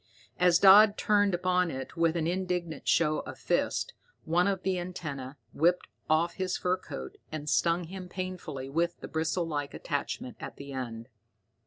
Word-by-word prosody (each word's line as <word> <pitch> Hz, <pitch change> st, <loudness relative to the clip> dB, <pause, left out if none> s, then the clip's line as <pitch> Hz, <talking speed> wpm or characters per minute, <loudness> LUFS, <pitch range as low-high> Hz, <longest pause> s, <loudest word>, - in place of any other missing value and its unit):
As 180 Hz, -1 st, +5 dB
Dodd 205 Hz, +3 st, +8 dB
turned 205 Hz, -3 st, +3 dB
upon 180 Hz, 0 st, +1 dB
it 130 Hz, 0 st, -6 dB
with 165 Hz, -1 st, +2 dB
an 165 Hz, -2 st, 0 dB
indignant 180 Hz, -3 st, -2 dB
show 155 Hz, -2 st, +3 dB
of -, -, -8 dB
fists, 480 Hz, -, 0 dB, 0.3 s
one 175 Hz, +4 st, +2 dB
of 195 Hz, -2 st, -1 dB
the 190 Hz, -1 st, 0 dB
antennae 145 Hz, -7 st, -5 dB, 0.2 s
whipped 175 Hz, +4 st, +2 dB, 0.2 s
off 160 Hz, +2 st, +3 dB
his 185 Hz, -1 st, -2 dB
fur 180 Hz, +1 st, 0 dB
coat 65 Hz, -, -8 dB
and 155 Hz, -1 st, -5 dB
stung 170 Hz, +3 st, +2 dB
him 180 Hz, +1 st, -8 dB
painfully 185 Hz, -8 st, -5 dB
with 170 Hz, +5 st, -1 dB
the -, -, -6 dB
bristle 165 Hz, +2 st, -1 dB
like 145 Hz, -3 st, -3 dB
attachment 145 Hz, -3 st, -4 dB
at -, -, -7 dB
the 140 Hz, 0 st, -9 dB
end. 115 Hz, -3 st, -5 dB
170 Hz, 165 wpm, -29 LUFS, 150-185 Hz, 0.3 s, Dodd